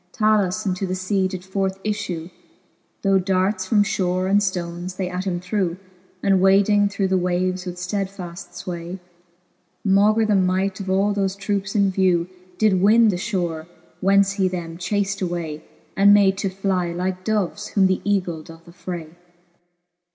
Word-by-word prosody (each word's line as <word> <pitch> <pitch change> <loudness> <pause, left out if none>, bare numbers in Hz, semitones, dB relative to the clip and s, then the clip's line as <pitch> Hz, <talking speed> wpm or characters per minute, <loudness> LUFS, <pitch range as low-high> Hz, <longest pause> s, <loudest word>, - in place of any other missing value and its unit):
Talus 215 -2 +1
into 190 0 -1
the 185 0 -3
lea 190 -2 +3
did 185 -1 -6
forth 190 0 -2
iffew, 185 -5 -3 0.7
Though 195 -1 +4
darts 185 +1 0
from 205 0 +4
fhore 185 -2 -1
and 200 +2 +4
ftones 180 -2 -3
they 185 - -1
at 180 +1 -4
him 175 -2 -1
threw; 180 -1 -1 0.5
And 195 -2 +3
wading 200 +1 +4
through 195 -1 -1
the 190 -1 +2
waves 180 +1 -1
with 175 - -4
ftedfaft 180 -1 -5 0.2
fway, 175 0 -5 0.9
Maugre 210 +3 +4
the 215 - +2
might 190 0 +1
of 195 -1 -5
all 195 +2 +2
thole 195 -1 0
troupes 195 0 -2
in 200 -2 +3
vew, 180 -3 +2 0.3
Did 200 -4 +3
win 220 +3 +5
the 185 - 0
fhore, 175 -6 -3 0.3
whence 195 +1 +4
he 195 -1 +1
them 170 -2 -5
chaft 200 +1 -1
away, 170 -4 -3 0.3
And 200 +1 +6
made 195 -2 +4
to 195 - -1
^y^ 185 -2 -1
like 185 +1 -3
doves, 210 -1 -1
whom 195 -2 +3
th' 185 - 0
eagle 185 -5 -1
doth 165 +1 -14
affray. 170 -2 -7
190 Hz, 160 wpm, -22 LUFS, 180-200 Hz, 0.9 s, And